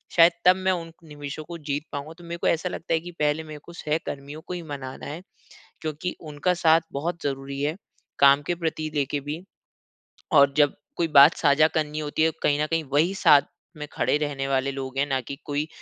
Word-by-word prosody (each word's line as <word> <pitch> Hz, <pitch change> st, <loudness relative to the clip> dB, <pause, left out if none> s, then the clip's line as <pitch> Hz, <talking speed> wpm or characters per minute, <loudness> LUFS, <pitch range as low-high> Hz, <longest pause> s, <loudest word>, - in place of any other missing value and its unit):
शायद 170 Hz, 0 st, +8 dB
तब 180 Hz, +1 st, +8 dB
मैं 190 Hz, 0 st, 0 dB
उन 165 Hz, -2 st, -3 dB
निवेशों 145 Hz, 0 st, -7 dB
को 170 Hz, +2 st, -8 dB
जीत 145 Hz, -1 st, -4 dB
पाऊँगा। 145 Hz, +3 st, -6 dB
तो 175 Hz, -, -14 dB
मेरे 170 Hz, 0 st, -6 dB
को -, -, -1 dB
ऐसा 170 Hz, +2 st, +1 dB
लगता 165 Hz, -1 st, -4 dB
है 160 Hz, -, +3 dB
कि 175 Hz, +2 st, -9 dB
पहले 150 Hz, +1 st, +1 dB
मेरे 155 Hz, -1 st, -9 dB
को 170 Hz, -, -12 dB
सहकर्मियों 150 Hz, -2 st, -4 dB
को 180 Hz, -, -4 dB
ही 175 Hz, -, -4 dB
मनाना 140 Hz, -4 st, -7 dB
है, 155 Hz, +5 st, -6 dB, 0.6 s
क्योंकि 155 Hz, +3 st, -4 dB
उनका 155 Hz, +3 st, -1 dB
साथ 160 Hz, +1 st, +6 dB
बहुत 165 Hz, +4 st, -3 dB
ज़रूरी 140 Hz, 0 st, -4 dB
है, 150 Hz, +3 st, -1 dB, 0.4 s
काम 140 Hz, +1 st, +6 dB
के 175 Hz, -, 0 dB
प्रति 160 Hz, -2 st, -3 dB
लेके 145 Hz, 0 st, 0 dB
भी, 150 Hz, +5 st, -6 dB, 0.9 s
और 140 Hz, -2 st, +6 dB
जब 145 Hz, -2 st, +4 dB, 0.2 s
कोई 170 Hz, -, 0 dB
बात 145 Hz, +4 st, +9 dB
साझा 150 Hz, 0 st, +4 dB
करनी 155 Hz, -1 st, -2 dB
होती 150 Hz, +1 st, -2 dB
है, 160 Hz, -, +3 dB
कहीं 145 Hz, 0 st, +2 dB
न 150 Hz, -, -1 dB
कहीं 165 Hz, 0 st, 0 dB
वही 165 Hz, +6 st, +3 dB
साथ 145 Hz, -6 st, +6 dB, 0.4 s
में 150 Hz, 0 st, -6 dB
खड़े -, -, +1 dB
रहने 145 Hz, -2 st, -2 dB
वाले 135 Hz, 0 st, +1 dB
लोग 135 Hz, -1 st, -6 dB
हैं, 140 Hz, -, +2 dB
ना 135 Hz, -2 st, 0 dB
कि 140 Hz, -, -7 dB
कोई 145 Hz, +1 st, -2 dB
150 Hz, 215 wpm, -25 LUFS, 145-165 Hz, 0.9 s, बात